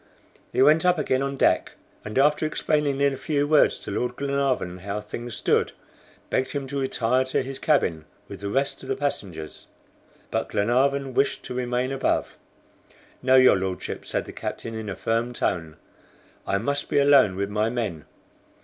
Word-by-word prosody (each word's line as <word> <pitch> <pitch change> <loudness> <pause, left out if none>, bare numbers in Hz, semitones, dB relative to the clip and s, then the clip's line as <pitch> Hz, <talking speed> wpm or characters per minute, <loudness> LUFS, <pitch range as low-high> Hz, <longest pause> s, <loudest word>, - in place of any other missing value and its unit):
He 130 - +3
went 155 +3 +5
up 180 -1 +3
again 130 -3 0
on 140 0 -2
deck, - - +2 0.3
and 105 +2 -5
after 150 +3 +3
explaining 150 -2 0
in 140 -1 +3
a - - -5
few 145 +1 0
words 150 0 +4
to - - -6
Lord 125 0 -2
Glenarvan 140 -10 -1
how 100 +3 -4
things 115 +2 -6
stood, - - +1 0.6
begged 130 - 0
him 140 -2 -3
to 140 +1 -2
retire 130 -1 +1
to 130 - 0
his 135 +1 -6
cabin, 85 - +1 0.2
with 100 - -9
the 100 +1 -4
rest 135 +6 -1
of 130 - -10
the 135 - +1
passengers. 95 - -4 0.6
But - - -1
Glenarvan 130 +5 +1
wished 140 +3 +1
to - - -6
remain 125 +1 -1
above. 135 0 -1 0.9
"No, 130 0 +4
your 130 -5 +7
Lordship," 95 -1 -4
said - - -2
the - - -9
captain 115 - -5
in 110 -2 -5
a 100 - -4
firm 115 +2 -1
tone, 80 -8 -2 0.7
"I 100 - +1
must 140 +8 -2
be - - +1
alone 140 -8 +5
with 100 +1 -2
my 105 +1 +1
men. 110 -10 -3
130 Hz, 175 wpm, -25 LUFS, 105-140 Hz, 0.9 s, your